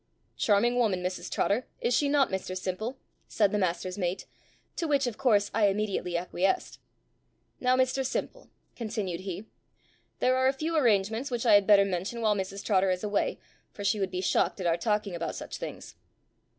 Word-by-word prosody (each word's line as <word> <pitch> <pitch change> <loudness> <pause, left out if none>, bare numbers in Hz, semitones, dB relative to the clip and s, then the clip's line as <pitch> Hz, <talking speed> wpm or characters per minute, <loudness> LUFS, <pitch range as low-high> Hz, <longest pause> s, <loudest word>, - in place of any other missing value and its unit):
"Charming 235 +4 +2
woman, 205 -7 +1
Mrs 185 0 -3
Trotter, 225 +6 0
is 245 - 0
she 285 - +2
not, 280 -4 +3
Mr 185 -1 -3
Simple?" 205 +8 -4 0.3
said 205 -3 +2
the 210 - 0
master's 185 +1 -2
mate; 180 0 -2 0.5
to 330 - -2
which 285 -2 +2
of 240 -3 -4
course 205 -6 +3
I 215 -1 +4
immediately 195 -3 -1
acquiesced. 180 +2 -1 0.8
"Now, 255 0 +3
Mr 260 +1 +1
Simple," - - -4 0.3
continued 210 -7 -3
he, 190 +2 -6 0.7
"there 255 0 +2
are 260 0 +3
a 265 - +3
few 315 +5 -3
arrangements 225 -1 +2
which 240 -1 -2
I 225 - +6
had 205 -1 +5
better 200 -2 +7
mention 190 +5 -3
while 215 -2 +3
Mrs 195 0 -4
Trotter 195 -2 +3
is 185 +1 -1
away, 205 -1 0 0.4
for 205 - -7
she 205 +1 +1
would 195 -1 0
be 185 0 -3
shocked 190 - +1
at 185 - -4
our 165 -1 +3
talking 210 +2 -1
about 170 -1 -3
such - - -6
things. - - -7
205 Hz, 185 wpm, -28 LUFS, 185-245 Hz, 0.8 s, better